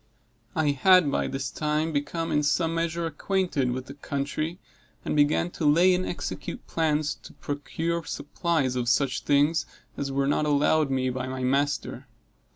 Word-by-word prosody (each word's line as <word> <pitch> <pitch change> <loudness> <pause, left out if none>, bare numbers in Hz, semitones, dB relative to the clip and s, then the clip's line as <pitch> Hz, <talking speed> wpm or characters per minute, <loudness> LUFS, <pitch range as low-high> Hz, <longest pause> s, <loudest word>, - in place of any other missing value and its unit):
I 155 -2 +2
had, 170 +2 +5
by - - 0
this 135 0 -3
time, 155 +1 -1
become 160 +3 -2
in 150 - +2
some 160 +3 +1
measure 165 0 -1
acquainted 165 -3 0
with 130 +1 -3
the 135 - -9
country, 145 +4 -3 0.5
and - - -1
began 150 +4 +2
to 165 - -4
lay 175 +5 +5
and 185 +1 0
execute 175 - -5
plans 155 -2 0
to - - -12
procure 165 +4 -3
supplies 145 -4 -1
of 120 -1 0
such 130 +1 +1
things 145 +3 +3 0.3
as 140 -1 -3
were 135 0 +1
not 145 +2 +1
allowed 150 +1 +3
me 130 -1 0
by 130 0 -4
my 130 0 -4
master. 140 0 -1
145 Hz, 160 wpm, -26 LUFS, 140-165 Hz, 0.5 s, had